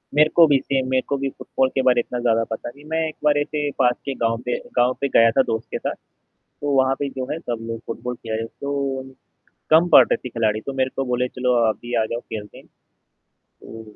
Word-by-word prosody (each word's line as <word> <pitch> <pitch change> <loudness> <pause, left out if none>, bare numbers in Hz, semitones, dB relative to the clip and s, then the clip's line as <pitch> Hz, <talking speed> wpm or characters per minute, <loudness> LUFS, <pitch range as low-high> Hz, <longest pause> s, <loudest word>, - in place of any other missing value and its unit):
मेरे 155 +1 +5
को 170 -1 +8
भी 145 -2 +4
सेम 135 -1 -1
मेरे 130 0 +2
को 140 - 0
भी 135 0 -2
फुटबॉल 130 0 -1
के 135 - +2
बार 125 -1 +5
इतना 125 +1 -3
ज़्यादा 115 -1 +2
पता 110 - -4
नहीं 140 +4 -15
मैं 160 0 0
एक 155 - -7
बार 150 -1 +4
इसे 145 0 -1
पास 125 0 +4
के 140 - -2
गाँव 115 0 +1
पे 125 - 0 0.2
गाँव 125 +1 +4
पे 140 - +2
गया 115 0 +6
था 135 - +4
दोस्त 110 -1 -3
के - - -1
साथ, - - -3 0.5
तो 145 0 -6
वहाँ 130 0 +3
पे 140 -1 -1
जो 130 -1 -5
है 155 - -3
सब 120 -8 -4
लोग 115 0 -4
फुटबॉल 125 +1 -4
खेल 115 -2 -7
रहे 115 +1 -2
तो 140 0 -3 0.7
कम 165 +3 +6
पड़ - - +10
रहे - - +1
थे 125 - -8
खिलाड़ी 110 -2 0
तो 140 - -3
मेरे 130 -1 0
को 135 - 0
बोले 125 0 0
चलो 125 0 0
आप 110 - 0
भी 120 0 -5
आ - - 0
जाओ 120 - -2
खेलते 105 -2 -8
हैं - - -16 0.7
तो 115 0 -13
130 Hz, 245 wpm, -22 LUFS, 115-140 Hz, 0.7 s, पड़